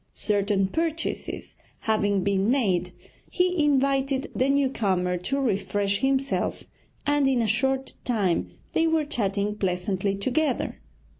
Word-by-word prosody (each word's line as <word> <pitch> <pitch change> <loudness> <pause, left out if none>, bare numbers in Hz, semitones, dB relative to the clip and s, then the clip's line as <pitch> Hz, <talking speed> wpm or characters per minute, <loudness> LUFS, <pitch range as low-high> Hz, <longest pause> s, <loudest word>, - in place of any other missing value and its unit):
Certain 200 -2 +1
purchases 325 - -3 0.3
having 205 -3 +1
been 200 +1 +1
made, 185 -9 +1 0.4
he 360 -3 +1
invited 275 0 +1
the 260 +2 +2
new 280 0 +3
comer 185 -7 0
to 180 +11 -2
refresh 200 -4 0
himself 270 0 0 0.4
and 290 -1 +3
in 265 -2 +2
a 230 - +2
short 265 +5 0
time 205 -8 0 0.2
they 330 - +3
were 320 -2 +2
chatting 205 -7 -1
pleasantly 190 0 -1
together. 260 +6 0
235 Hz, 125 wpm, -26 LUFS, 195-275 Hz, 0.4 s, new